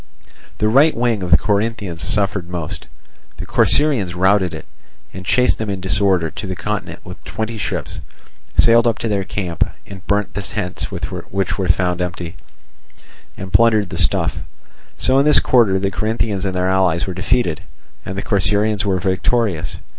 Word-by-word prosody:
The 105 - +1
right 140 +7 +4
wing 115 -3 +1
of 90 - -3
the 85 - +7
Corinthians 105 -5 -2
suffered 100 0 -1
most. 85 -3 -5 0.5
The - - -6
Corcyraeans 125 -12 +3
routed 95 0 +3
it, 80 - -8 0.5
and 95 - -8
chased 125 +6 +2
them 110 -1 -3
in 100 -2 -3
disorder 95 -3 +1
to 100 - -6
the 95 - -4
continent 105 +3 -4
with - - -11
twenty 110 +1 -4
ships, - - -4 0.6
sailed 115 0 +6
up 115 -1 +1
to - - -3
their 100 -3 0
camp, 90 -4 -2 0.2
and 95 -2 -11
burnt 100 0 0
the 100 - -3
tents 95 -2 -3
which - - -7 0.5
they 95 -2 -2
found 90 +1 +1
empty, 90 -1 -4 1.0
and 95 -1 -8
plundered 110 -5 +4
the - - -4
stuff. - - +1 0.6
So 130 - +3
in 140 - +3
this 150 - +5
quarter 115 -7 +3
the 95 0 -1
Corinthians 105 -1 -1
and 95 -1 -2
their 90 0 0
allies 95 -3 +2
were 95 - -4
defeated, 90 -2 0 0.4
and 95 - -6
the 100 - -3
Corcyraeans 105 +1 +2
were 95 -2 0
victorious. 95 0 0
100 Hz, 170 wpm, -19 LUFS, 90-110 Hz, 1.0 s, the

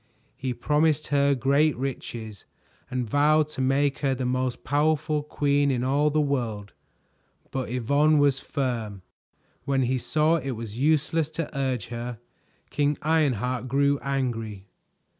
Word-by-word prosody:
He 130 -1 -3
promised 150 +4 +1
her 140 0 +3
great 140 +3 +2
riches 120 -5 -5 0.4
and 125 -2 -2
vowed 150 +4 +3
to 145 - -5
make 135 +2 +1
her 135 -2 +1
the 130 0 -3
most 125 0 -1
powerful 150 +1 +1
queen 145 -1 +1
in 125 -2 0
all 140 +3 +2
the 155 +1 +1
world, 120 -8 -2 0.8
but 130 -3 -3
Yvonne 140 +6 +2
was 140 -2 +3
firm. 115 -9 -3 0.6
When 135 -2 +1
he 130 +1 0
saw 155 +6 +2
it 135 -5 -4
was 115 0 -7
useless 155 +2 +2
to 160 -1 -5
urge 130 -6 -2
her, 120 0 -5 0.5
King 145 0 +1
Ironheart 130 -6 +1
grew 140 +2 +2
angry. 115 -7 -3
135 Hz, 140 wpm, -26 LUFS, 125-150 Hz, 0.8 s, her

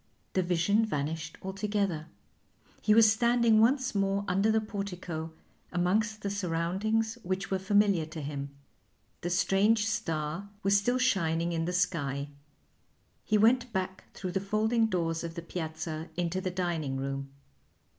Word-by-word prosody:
The 190 - +2
vision 180 +5 +2
vanished 155 -4 -3
altogether; 195 -4 -2 0.7
he 215 - +4
was 225 -1 +7
standing 235 -1 +4
once 260 +3 +3
more 195 0 0
under 195 +4 +2
the 220 0 +4
portico 180 -6 -5 0.4
amongst 210 +5 0
the 200 - -1
surroundings 200 +5 -1
which 190 +1 -3
were 190 - +1
familiar 195 -4 +3
to 160 0 -7
him. 140 -1 -4 0.7
The 175 - -2
strange 200 +4 +3
star 175 -4 -2
was 195 0 +4
still 240 +5 +2
shining 170 -9 +1
in 165 -1 -1
the 180 - -1
sky. 145 -6 0 0.9
He 215 - +2
went 240 +3 +4
back 190 -1 -3
through 185 -2 -4
the 195 - 0
folding 220 +3 +2
doors 165 -5 -1
of 165 0 -5
the 170 - -5
piazza 160 -1 -5
into 175 +1 -1
the 185 - -1
dining 170 -7 -2
room. 135 0 -3
190 Hz, 145 wpm, -30 LUFS, 165-215 Hz, 0.9 s, was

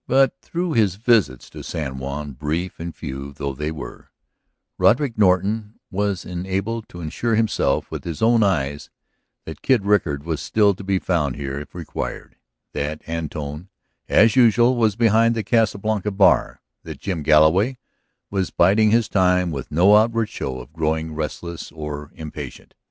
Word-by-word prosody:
But 135 0 +4
through 175 -1 -3
his 105 -7 +2
visits 105 - +2
to - - -9
San 65 -4 -5
Juan, 70 +2 -5
brief 80 +6 -3
and 85 0 -6
few 70 -1 -7
though 70 0 -4
they 75 +3 -3
were, 80 -3 -9 0.7
Roderick 125 0 +3
Norton 105 +2 +1 0.2
was 100 -1 -1
enabled 95 +5 -3
to 90 - -9
assure 110 +9 -1
himself 110 -1 0
with - - -5
his 85 -3 -5
own 115 0 +4
eyes 75 -8 0 0.6
that 80 -2 -8
Kid 125 -7 +2
Rickard 85 -9 +1
was 80 -2 -3
still 105 -2 +3
to 100 - -10
be 95 0 +1
found 80 -8 0
here 70 -1 -4
if 75 - -11
required, - - -6 0.4
that 75 +2 -3
Antone, 80 0 -5 0.4
as 115 0 +5
usual, 120 0 +5
was 110 -4 +2
behind 115 0 +3
the 110 - -2
Casa 115 0 +2
Blanca 105 0 -1
bar; 100 -1 +2 0.2
that - - -9
Jim 90 -5 -3
Galloway 80 - +4 0.5
was 95 -2 -1
biding 105 +5 +4
his 115 0 +3
time 90 -2 +2
with 70 -4 -5
no 90 +7 +5
outward 115 0 +2
show 65 -11 -5
of 60 +4 -12
growing 80 0 -1
restless 80 +2 -5
or 75 -2 -6
impatient. 75 -4 -8
90 Hz, 160 wpm, -22 LUFS, 75-110 Hz, 0.7 s, as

